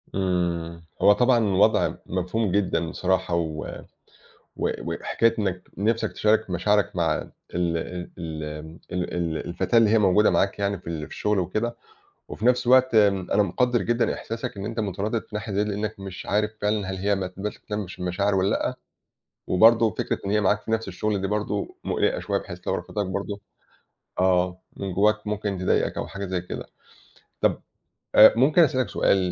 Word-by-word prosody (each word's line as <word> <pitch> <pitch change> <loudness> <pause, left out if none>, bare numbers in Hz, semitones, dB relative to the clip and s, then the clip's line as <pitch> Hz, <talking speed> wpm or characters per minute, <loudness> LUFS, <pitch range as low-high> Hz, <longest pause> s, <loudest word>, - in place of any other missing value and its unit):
إمم 85 -3 -1 0.2
هو 105 - +7
طبعًا 125 +4 +3
الوَضع 105 0 +3
مفهوم 95 +3 -1
جدًا 85 -4 0
بصراحة 95 -1 0
و 80 -2 -2 0.9
و - - -1
وحكاية 115 0 0
إنّك 95 -3 -3
نِفسَك 110 +4 0
تشارك 110 0 +2
مشاعرك 100 +2 +1
مع - - +1 0.4
ال 85 -1 0 0.4
ال 80 -3 -5
امم 75 +2 -8
ال 90 0 -3
ال 85 -2 -1
الفتاة 90 +7 0
اللي 115 -2 +5
هي 110 - +4
موجودة 105 +1 +4
معاك 100 +1 +1
يعني 100 -1 -1
في 90 - -18
ال 80 -2 -3
في - - -16
الشغل 105 -1 0
وكده، 110 +7 -2 0.5
وفي 110 - -6
نَفس 125 0 +3
الوقت 130 -1 +5
آمم 100 -4 +3
أنا 105 - +4
مُقَدِّر 125 +3 +1
جدًا 120 0 +1
إحساسك 115 -2 -5
إن 100 - -5
أنت 115 +1 -4
مُتردِد 105 +2 -2
في 105 - -12
ناحية 105 0 -4
زي 100 +2 +2
دِيَّة 105 - -2
لأنّك 105 0 -4
مش 95 -1 -7
عارف 105 +1 +1
فعلًا 105 -2 0
هل 95 - -3
هي 100 +2 +1
ما 95 -1 -2
تبقاش 100 +3 -6
تهتمش 105 -3 -5
بالمشاعر 95 +3 0
والّا 95 +1 +2
لأ، - - -1 0.7
وبرضه 115 +4 +5
فكرة - - -2
إن - - -1
هي 105 +1 +3
معاك 105 +1 +2
في - - -7
نَفس 110 0 0
الشغل 100 +2 -1
دي 95 - -1
برضه 105 0 -2
مُقلِقَة - - 0
شوية - - -1
بحيث - - -9
لو - - +1
رفَضِتك 105 -2 -3
برضه 100 +2 -4 0.8
آه 90 0 +2 0.2
من 95 -1 -4
جوّاك 105 +3 +2
ممكن 105 -2 -2
تضايقك 90 - +1
أو - - -3
حاجة 100 0 -6
زي 90 -1 -2
كده. 90 - -7 0.7
طَب - - +2 0.6
آآ 110 - +9
ممكن 140 +8 +4
أسألك 130 -7 +2
سؤال - - +2
100 Hz, 180 wpm, -25 LUFS, 90-110 Hz, 0.9 s, آآ